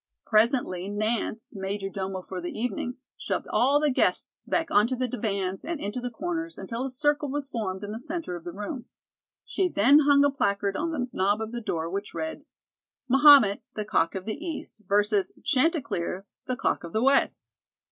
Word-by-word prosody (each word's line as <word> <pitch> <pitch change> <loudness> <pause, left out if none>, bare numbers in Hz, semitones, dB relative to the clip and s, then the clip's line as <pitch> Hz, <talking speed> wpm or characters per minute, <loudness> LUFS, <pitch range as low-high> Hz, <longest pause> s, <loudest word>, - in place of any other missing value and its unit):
Presently, 215 -5 +2
Nance, 215 +1 -1
major 195 +1 -3
domo 190 -1 -4
for 185 -1 -6
the 175 - -4
evening, 245 +1 -3 0.2
shoved - - -2
all 275 +4 +4
the 300 -1 +2
guests - - 0
back 330 -1 0
onto 225 +5 +4
the 255 0 -1
divans 200 -5 -2
and 330 -1 -3
into 205 +3 -3
the 245 - -3
corners 335 +6 -4
until 230 +6 -4
a 270 - -2
circle 290 +2 0
was 285 0 -3
formed 205 -7 -4
in 205 - -5
the 220 - -5
centre 315 - -4
of 170 - -8
the 175 - -6
room. 210 - -6 0.6
She 380 - 0
then 280 - +5
hung 285 -1 +5
a 285 - +3
placard 200 -6 0
on 335 - -1
the 270 -6 -2
knob 200 +3 +2
of 220 0 -4
the 240 0 -4
door 165 -6 -2
which 200 +3 -5
read: 160 - -4 0.6
MAHOMET, 270 -6 +7
THE 215 - -3
COCK 200 -5 +1
OF 190 -1 -4
THE 255 +9 -4
EAST, 300 - -6
vs. 205 -1 +2
CHANTECLER, 265 - 0 0.2
THE 255 - -1
COCK - - -1
OF 170 - -8
THE 220 - +1
WEST. 275 +1 +2
225 Hz, 190 wpm, -27 LUFS, 195-280 Hz, 0.6 s, MAHOMET